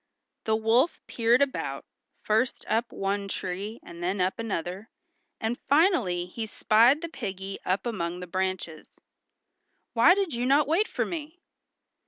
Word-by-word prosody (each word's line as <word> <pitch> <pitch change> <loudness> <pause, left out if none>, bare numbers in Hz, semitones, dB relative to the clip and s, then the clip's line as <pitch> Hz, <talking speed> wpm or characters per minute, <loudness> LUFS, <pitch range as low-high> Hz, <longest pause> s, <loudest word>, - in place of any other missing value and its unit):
The 220 - +2
wolf 230 +8 +2
peered 235 +3 +3
about, 280 - -3 0.4
first 220 +4 0
up 230 +1 0
one 200 +1 -2
tree 195 +4 -4
and 170 0 -11
then 185 +3 -1
up 185 +3 0
another, 195 -1 -4 0.5
and 225 +2 -2
finally 270 - +3
he 220 +5 -5
spied 235 +8 +4
the - - -2
piggy 195 - -6
up 190 +3 0
among 180 -7 -3
the 180 - -6
branches. 185 -3 -4 1.0
"Why 300 +10 +6
did 390 -6 -1
you 240 +1 -1
not 280 +2 +4
wait 345 +8 +2
for - - -1
me?" 320 +1 -6
220 Hz, 145 wpm, -27 LUFS, 190-260 Hz, 1.0 s, Why